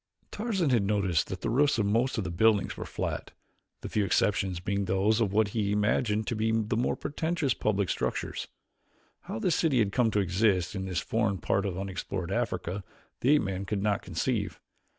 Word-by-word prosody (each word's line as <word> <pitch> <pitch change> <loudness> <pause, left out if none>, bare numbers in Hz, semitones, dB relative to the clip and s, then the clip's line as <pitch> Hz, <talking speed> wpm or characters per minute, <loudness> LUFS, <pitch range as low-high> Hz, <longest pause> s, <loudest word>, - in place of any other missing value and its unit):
Tarzan 200 - 0
had 120 -4 +4
noticed 100 -5 +1
that - - -6
the - - -1
roofs 140 +2 +3
of 110 - +1
most 115 +6 +1
of 110 - 0
the 90 - -4
buildings 105 +3 +3
were - - -6
flat, - - -4 0.5
the - - -5
few 105 - 0
exceptions 95 -2 +1
being 100 +2 -1
those 100 +4 +2
of 105 -4 +1
what 105 0 +2
he 100 -1 -1
imagined 105 +1 +1
to 120 - -2
be 110 +1 0
the 110 -1 0
more 120 - +1
pretentious 160 -3 -1
public 100 -2 0
structures. - - -2 0.8
How - - -4
this 165 +9 +1
city 155 -6 +2
had 105 -4 +2
come 120 +1 +2
to 105 - +1
exist 95 -1 +1
in 95 -1 -3
this 90 -2 -1
forgotten 110 -3 0
part 100 +2 0
of 90 -2 -4
unexplored 95 -1 -4
Africa 100 -4 -2 0.4
the 130 - +1
ape 150 - +2
man 95 -1 -3
could 100 0 -2
not 105 -2 +1
conceive. 95 - -2
105 Hz, 195 wpm, -29 LUFS, 95-115 Hz, 0.8 s, had